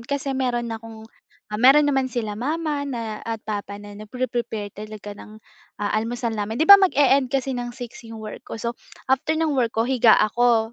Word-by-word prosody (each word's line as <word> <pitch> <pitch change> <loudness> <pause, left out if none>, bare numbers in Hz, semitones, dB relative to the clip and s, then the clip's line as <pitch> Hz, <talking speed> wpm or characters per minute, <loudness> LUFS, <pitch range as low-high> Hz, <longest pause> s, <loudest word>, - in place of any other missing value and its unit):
kasi 275 +3 -3
meron 245 -3 -1
akong, 225 -1 -9 0.6
meron 275 +4 +7
naman 270 -2 +1
sila 230 -4 -3
mama 295 +6 -2 0.5
at 225 -1 -3
papa 205 -1 -4
na 205 0 -11
na 210 +1 -10
pre-prepare 235 -5 -3
talaga 210 0 -8
ng 215 +1 -12 0.4
almusal 225 +3 -2
namin 215 +1 -3
'di 315 - +2
ba 400 +1 +10
mag-eend 280 -7 +4
kasi 270 0 -1
ng 245 -1 -3
6 245 -2 -8
iyong 225 - -8
work 215 - -7
ko - - -5
so 235 +1 -3 0.4
after 310 +4 +1
ng 320 -2 +1
work 240 -4 0
ko 225 - +2
higa 245 -3 +5
ako, 230 0 +2
240 Hz, 180 wpm, -23 LUFS, 220-265 Hz, 0.6 s, ba